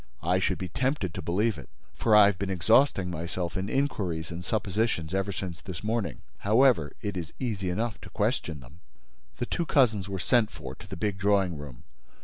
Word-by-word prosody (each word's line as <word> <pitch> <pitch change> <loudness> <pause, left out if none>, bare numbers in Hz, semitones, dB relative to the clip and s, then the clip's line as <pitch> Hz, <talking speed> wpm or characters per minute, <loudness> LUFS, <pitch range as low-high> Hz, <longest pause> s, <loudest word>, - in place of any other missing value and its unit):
I 90 +3 +2
should 95 - +1
be 95 - -4
tempted 130 - -1
to - - -4
believe 105 +5 0
it, - - -11 0.2
for 110 -2 +3
I 105 -1 +9
have 100 -3 +1
been 100 - -2
exhausting 95 +1 +3
myself 85 +2 -3
in 95 +1 -2
inquiries 95 - -1
and 85 +1 -6
suppositions 100 -4 -1
ever 95 +1 0
since 90 -3 -5
this 95 -1 -7
morning. 105 - -2 0.2
However, 110 - +4
it 100 -2 -2
is 85 -2 -5
easy 105 -8 -2
enough 110 +4 -2
to - - -10
question 105 - -1
them." 65 +8 -15 0.6
The 120 - -1
two 170 +6 -2
cousins 110 -8 +3
were 95 - -3
sent 110 +7 +3
for 65 -1 -8
to 90 - -13
the 95 -1 -7
big 100 0 -1
drawing 100 -3 +2
room. 70 -4 -9
95 Hz, 195 wpm, -28 LUFS, 85-110 Hz, 0.6 s, I